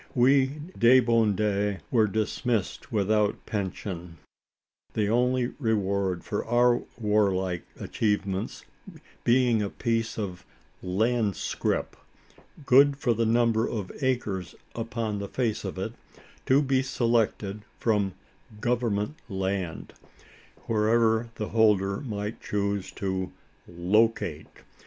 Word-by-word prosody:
We, 135 +3 +3
the 120 +3 +6
debandes, 105 -3 +1
were 110 -4 +4
dismissed 110 +3 -2
without 105 -1 +1
pension: 90 -4 -4 0.8
the 105 -2 +1
only 125 +2 +1
reward 100 - 0
for 105 - -2
our 120 +1 +3 0.2
warlike 100 -5 +1
achievements 100 -3 -2 0.6
being 120 -2 +3
a 100 - -1
piece 115 +1 -1
of 95 -4 -4 0.4
"land 105 +2 +1
scrip," - - -2 0.7
good 140 +1 +6
for 125 -4 +1
the 115 0 0
number 115 -1 +2
of 105 -5 -4
acres 105 -9 -1 0.2
upon 115 -2 -3
the 100 - -4
face 115 -5 -1
of - - -5
it - - -3 0.5
to 135 +3 +5
be 135 -1 +2
selected 115 -5 0 0.2
from 105 -5 +1 0.4
"government 120 +2 0
land," 95 -3 -3 0.7
wherever 110 +1 +2
the 105 - -4
holder 105 -3 +3
might 105 -4 -5
choose 100 -1 -2
to 95 -1 -3 0.4
"locate." 100 +7 +1
110 Hz, 105 wpm, -27 LUFS, 100-120 Hz, 0.8 s, the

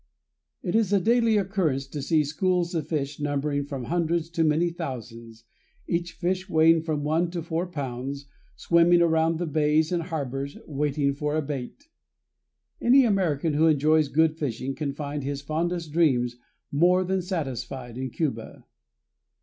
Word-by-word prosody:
It 180 - -2
is 220 -3 +2
a 200 - +4
daily 230 +2 +3
occurrence 180 -9 0
to 145 0 -5
see 155 +2 +2
schools 175 +3 0
of 160 -3 -2
fish 145 -2 -3
numbering 145 0 -1
from 140 -3 -5
hundreds 170 +2 -1
to 165 -1 +1
many 160 +3 +2
thousands, 115 -8 -7 0.4
each 170 0 -2
fish 185 +2 -2
weighing 160 0 +5
from 155 -2 -2
one 160 +3 +1
to 170 -1 -4
four 170 +2 -2
pounds, 140 -3 -5 0.3
swimming 170 0 +4
around 160 0 +2
the 175 - -2
bays 155 +1 +2
and 175 -1 0
harbors 140 -4 -4
waiting 145 -1 0
for 150 +1 -2
a 155 - +1
bait. 140 - -6 0.9
Any 260 +2 +6
American 170 -8 +1
who 155 +3 +4
enjoys 155 0 +3
good 160 +2 +2
fishing 135 -1 -3
can 145 -1 -3
find 145 0 -5
his 140 0 -4
fondest 165 +2 -2
dreams 130 -7 +2 0.4
more 180 +5 +4
than 190 +1 0
satisfied 130 - -4
in 130 +1 -4
Cuba. 115 -5 -4
155 Hz, 155 wpm, -26 LUFS, 140-170 Hz, 0.9 s, Any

